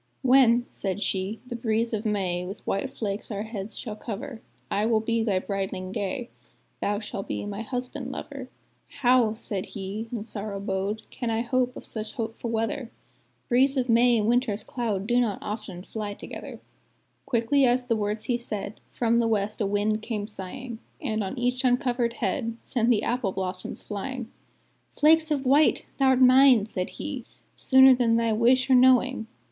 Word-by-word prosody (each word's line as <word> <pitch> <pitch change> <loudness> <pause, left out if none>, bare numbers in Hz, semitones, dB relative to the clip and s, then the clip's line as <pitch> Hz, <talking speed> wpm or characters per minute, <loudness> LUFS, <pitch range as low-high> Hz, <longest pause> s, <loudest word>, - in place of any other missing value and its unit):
"When," 250 -2 +5
said 195 0 -3
she, 190 +3 -2
"the 245 -1 -6
breeze 230 0 0
of 220 +1 -1
May 185 -4 -1
With 190 +2 -8
white 195 +7 -1
flakes 205 -1 -3
our 205 -2 -3
heads 215 -2 -6
shall 215 -4 -5
cover, 225 +3 -6 0.3
I 205 - +1
will 225 -1 +3
be 230 +1 0
thy 205 -4 +1
brideling 190 -1 -4
gay 240 +6 -3 0.5
Thou 205 0 0
shall 205 -2 -5
be 195 - -4
my 205 +1 -5
husband 250 +3 -5
lover." 270 -2 -7 0.5
"How," 245 -4 +4
said 200 -4 -3
he, 205 +4 -5
in 230 -4 -3
sorrow 210 -2 -5
bowed, 195 +2 -2
"Can 240 - -3
I 225 0 0
hope 250 +1 0
such 215 -1 -4
hopeful 230 0 -4
weather? 225 +2 -2 0.6
Breeze 270 +3 +3
of 255 -1 0
May 235 +1 +5
and 210 -1 +1
Winter's 230 -3 +1
cloud 215 -6 -2
Do 240 +2 +2
not 225 -5 +1
often 210 -4 -6
fly 210 -1 -5
together." - - -8 0.7
Quickly 250 +2 +2
as 250 +1 +3
the 240 -2 0
words 210 0 -2
he 245 -1 0
said, 210 -3 -5
From 235 -1 +2
the 230 - +2
west 215 0 -1
a 205 - +2
wind 210 +2 0
came 215 -3 -3
sighing, 225 +4 -7 0.2
And 220 -6 -1
on 195 +7 -5
each 250 +1 0
uncovered 245 -2 +1
head 230 -1 -2
Sent 240 -2 +1
the 230 -4 +3
apple 240 -6 -1
blossoms 185 -1 -4
flying; 240 +3 -5 0.7
"'Flakes 315 +1 +6
of 285 -3 0
white!' 285 +4 +4
thou'rt 265 -1 +4
mine," 255 -3 +7
said 185 -4 -3
he, 280 -5 -5 0.3
"Sooner 265 0 +7
than 240 -2 +2
thy 230 -1 +2
wish 245 +4 +3
or 265 - +4
knowing!" 255 -2 +4
230 Hz, 175 wpm, -26 LUFS, 205-250 Hz, 0.7 s, mine